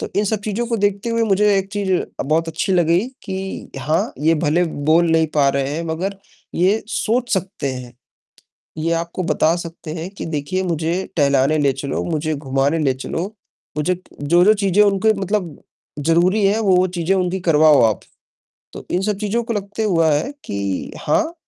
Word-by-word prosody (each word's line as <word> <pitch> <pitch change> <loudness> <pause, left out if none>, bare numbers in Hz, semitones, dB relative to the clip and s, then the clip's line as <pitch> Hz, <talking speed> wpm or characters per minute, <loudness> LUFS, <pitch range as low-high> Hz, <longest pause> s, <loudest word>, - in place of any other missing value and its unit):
तो - - -4
इन 205 - +3
सब 210 0 -1
चीज़ों 220 +3 -2
को 235 -1 -1
देखते 205 +2 0
हुए 230 0 +1
मुझे 205 0 +3
एक 195 0 -3
चीज़ 200 -2 -1
अ, 180 - -2
बहुत 160 +3 +1
अच्छी 165 +4 -1
लगी 170 -1 +3 0.2
कि 190 0 -5
हाँ, 155 +5 0
ये 160 +3 +3
भले 170 +4 +3 0.3
बोल 165 +1 +4
नहीं 160 0 +3
पा 145 -2 +4
रहे 135 0 -1
हैं, 165 - -3
मगर 180 +5 -3 0.4
ये 195 +5 +2
सोच 240 +2 0
सकते 185 -7 -3
हैं। 125 -1 -9 0.8
ये 165 +2 0
आपको 170 +2 -2
बता 160 +1 +2
सकते 165 -2 -7
हैं 170 +2 -5
कि 200 - -7
देखिए 160 +4 -2
मुझे 165 -1 -1 0.2
टहलाने 140 0 +3
ले 140 -2 +3
चलो, 135 +1 -3
मुझे 155 -1 -1
घुमाने 140 +2 0
ले 140 -4 +1
चलो। 140 +6 -4 0.5
मुझे 155 +5 +1 0.3
जो-जो 175 +7 +5
चीज़ें 200 0 +3
उनके 205 +2 +3
मतलब 190 -5 -2 0.4
ज़रूरी 175 +7 +2
है, 205 +3 +2
वो-वो 185 -3 +3
चीज़ें 175 +3 +1
उनकी 185 0 0
करवाओ 155 -3 +5
आप। 110 -3 +2 0.7
तो - - -9
इन 180 - +1
सब 210 0 0
चीज़ों 215 +3 -1
को 235 0 -3
लगते 205 +1 -3
हुआ 165 -6 +3
है 150 - 0
कि 100 -2 -3
हाँ, 320 - +1
170 Hz, 180 wpm, -20 LUFS, 155-195 Hz, 0.8 s, जो-जो